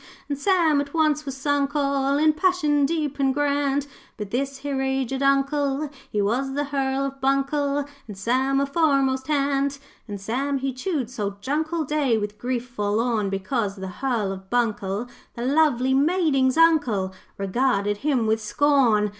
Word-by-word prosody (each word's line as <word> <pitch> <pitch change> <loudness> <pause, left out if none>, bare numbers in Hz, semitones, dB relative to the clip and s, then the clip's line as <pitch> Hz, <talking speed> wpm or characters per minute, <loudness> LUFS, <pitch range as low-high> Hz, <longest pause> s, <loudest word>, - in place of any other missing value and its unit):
'And 285 - -2
Sam 320 -2 +2
at 285 +2 -7
once 305 -2 +1
was 270 -1 -4
sunk 285 +1 0
all 275 -1 +1
In 310 +1 +4
passion 305 -4 +2
deep 300 -3 -2
and 270 -1 +3
grand, 285 0 0 0.3
But 210 -2 -6
this 275 +2 -2
here 275 -1 -3
aged 265 0 -1
Uncle 275 +1 +1 0.2
He 205 -1 0
was 265 +6 -1
the 290 - 0
Hearl 275 -1 -1
of 275 0 -6
Buncle 275 +1 +1 0.2
And 205 -3 -9
Sam 260 +6 +1
a 280 - +2
foremast 275 -3 +1
hand. 280 -1 0 0.3
'And 205 -2 -6
Sam 265 +8 -1
he 270 0 -2
chewed 260 - -3
salt 200 -5 -4
junk 310 +4 -1
all 335 -2 0
Day 280 -5 +1
with 210 0 -4
grief 245 0 -2
forlorn, 215 -1 0
Because 195 +1 -2
the 190 -1 -6
Hearl 235 -7 0
of 190 0 -9
Buncle, 215 -2 -1 0.3
The 235 - -4
lovely 265 -3 +3
maiding's 285 -3 +2
Uncle, 275 - +3 0.2
Regarded 205 0 0
him 265 -2 0
with 220 0 +1
scorn. 235 -3 +3
270 Hz, 165 wpm, -24 LUFS, 235-285 Hz, 0.3 s, In